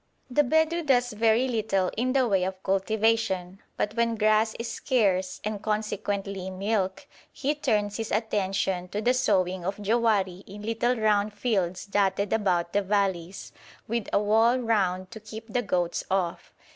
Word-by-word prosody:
The 295 Hz, -, +4 dB
Bedou 320 Hz, +4 st, +2 dB
does 245 Hz, -5 st, +2 dB
very 225 Hz, +3 st, +3 dB
little 215 Hz, -6 st, 0 dB
in 255 Hz, +3 st, 0 dB
the 265 Hz, -2 st, +3 dB
way 195 Hz, -4 st, +2 dB
of 185 Hz, 0 st, -4 dB
cultivation, 195 Hz, -2 st, 0 dB, 0.2 s
but 210 Hz, -, -1 dB
when 230 Hz, 0 st, +1 dB
grass 215 Hz, 0 st, +2 dB
is 230 Hz, -, -4 dB
scarce, 195 Hz, -10 st, 0 dB
and 210 Hz, -1 st, -3 dB
consequently 205 Hz, -3 st, -2 dB
milk, 195 Hz, 0 st, -2 dB, 0.3 s
he 285 Hz, +2 st, -1 dB
turns 210 Hz, -8 st, 0 dB
his 225 Hz, -1 st, -4 dB
attention 195 Hz, -4 st, -1 dB
to 205 Hz, +3 st, -4 dB
the 245 Hz, -, +4 dB
sowing 185 Hz, -7 st, +1 dB
of 195 Hz, +3 st, -3 dB
jowari 205 Hz, -4 st, +1 dB
in 205 Hz, +2 st, -10 dB
little 230 Hz, +3 st, 0 dB
round 210 Hz, -2 st, +1 dB
fields 190 Hz, -6 st, -1 dB
dotted 200 Hz, 0 st, 0 dB
about 180 Hz, -6 st, +1 dB
the 205 Hz, -, +3 dB
valleys, 195 Hz, -3 st, -1 dB, 0.4 s
with 230 Hz, -1 st, -2 dB
a -, -, +3 dB
wall 220 Hz, +4 st, +3 dB
round 190 Hz, -6 st, 0 dB
to 220 Hz, -, -8 dB
keep 220 Hz, +1 st, -9 dB
the 245 Hz, -, +2 dB
goats 180 Hz, -5 st, -1 dB
off. 185 Hz, -3 st, -1 dB
210 Hz, 160 wpm, -27 LUFS, 190-225 Hz, 0.4 s, The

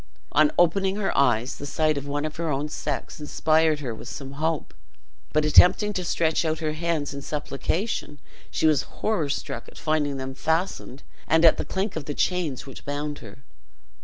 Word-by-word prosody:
On 150 Hz, 0 st, +4 dB
opening 190 Hz, +3 st, +3 dB
her 205 Hz, -2 st, -1 dB
eyes, 125 Hz, -2 st, +2 dB
the 145 Hz, -, -6 dB
sight 155 Hz, +1 st, +1 dB
of 140 Hz, 0 st, -4 dB
one 145 Hz, +1 st, -2 dB
of 155 Hz, +1 st, -5 dB
her 165 Hz, -1 st, -2 dB
own 145 Hz, +1 st, -1 dB
sex 145 Hz, 0 st, -4 dB
inspired 155 Hz, 0 st, +2 dB
her 125 Hz, -5 st, -3 dB
with 110 Hz, -, -9 dB
some 135 Hz, -2 st, -7 dB
hope; 155 Hz, +3 st, -2 dB, 0.6 s
but 155 Hz, 0 st, +2 dB
attempting 180 Hz, +7 st, +6 dB
to 185 Hz, -, -2 dB
stretch 160 Hz, -1 st, +1 dB
out 160 Hz, -1 st, 0 dB
her 155 Hz, -1 st, -2 dB
hands 155 Hz, -3 st, -1 dB
in 140 Hz, -, -6 dB
supplication, 150 Hz, -, -3 dB, 0.3 s
she -, -, -1 dB
was 155 Hz, -3 st, +4 dB
horror 205 Hz, -10 st, -2 dB
struck 140 Hz, -3 st, -4 dB
at -, -, -14 dB
finding 150 Hz, -3 st, 0 dB
them 130 Hz, 0 st, -5 dB
fastened, 160 Hz, -1 st, -2 dB, 0.2 s
and 160 Hz, +2 st, +4 dB
at 165 Hz, -, +7 dB
the -, -, -2 dB
clink 190 Hz, +1 st, -2 dB
of 160 Hz, -3 st, -4 dB
the 145 Hz, -, -4 dB
chains 175 Hz, -8 st, -1 dB
which 135 Hz, -, -10 dB
bound 145 Hz, +1 st, -3 dB
her. 115 Hz, +4 st, -13 dB
155 Hz, 190 wpm, -25 LUFS, 140-165 Hz, 0.6 s, at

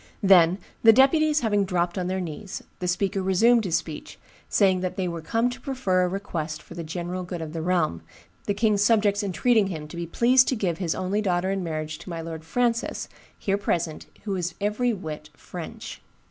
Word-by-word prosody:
"Then, 180 Hz, -2 st, +6 dB, 0.2 s
the 225 Hz, -, +8 dB
deputies 300 Hz, +5 st, +4 dB
having 205 Hz, -3 st, +2 dB
dropped 175 Hz, -2 st, -1 dB
on 180 Hz, -2 st, -2 dB
their 190 Hz, +1 st, -1 dB
knees, 185 Hz, +3 st, -6 dB, 0.2 s
the 180 Hz, -, -2 dB
speaker 190 Hz, +2 st, 0 dB
resumed 220 Hz, +5 st, +4 dB
his 170 Hz, -2 st, +2 dB
speech, 155 Hz, -2 st, -7 dB, 0.3 s
saying 190 Hz, -3 st, +3 dB
that 185 Hz, 0 st, -3 dB
they 185 Hz, -2 st, 0 dB
were 170 Hz, -1 st, -4 dB
come 230 Hz, +8 st, +1 dB
to 245 Hz, +2 st, -9 dB
prefer 250 Hz, -10 st, 0 dB
a 180 Hz, -, +2 dB
request 170 Hz, -5 st, -4 dB
for -, -, -12 dB
the 170 Hz, -1 st, -6 dB
general 175 Hz, +3 st, -4 dB
good 175 Hz, -1 st, -5 dB
of 160 Hz, -1 st, -6 dB
the 165 Hz, -, -3 dB
realm, 165 Hz, -, 0 dB, 0.5 s
the 205 Hz, -, +1 dB
king's 210 Hz, -1 st, +2 dB
subjects 205 Hz, -2 st, +3 dB
entreating 210 Hz, +2 st, +2 dB
him 155 Hz, -5 st, -5 dB
to -, -, -9 dB
be 170 Hz, 0 st, -4 dB
pleased 250 Hz, +8 st, +4 dB
to 260 Hz, -, +1 dB
give 180 Hz, -7 st, -1 dB
his 175 Hz, -4 st, -1 dB
only 190 Hz, +3 st, -1 dB
daughter 185 Hz, -1 st, 0 dB
in 195 Hz, -1 st, -2 dB
marriage 155 Hz, -2 st, -4 dB
to 165 Hz, -, -10 dB
my 170 Hz, -1 st, -4 dB
lord 160 Hz, -1 st, -6 dB
Francis, 235 Hz, +7 st, -1 dB, 0.3 s
here 200 Hz, 0 st, -1 dB
present, 170 Hz, -5 st, -2 dB, 0.2 s
who 200 Hz, -2 st, -2 dB
is 175 Hz, -2 st, -3 dB
every 210 Hz, +4 st, +1 dB
whit 155 Hz, -7 st, -6 dB
French. 170 Hz, +2 st, -8 dB
185 Hz, 200 wpm, -25 LUFS, 170-210 Hz, 0.5 s, the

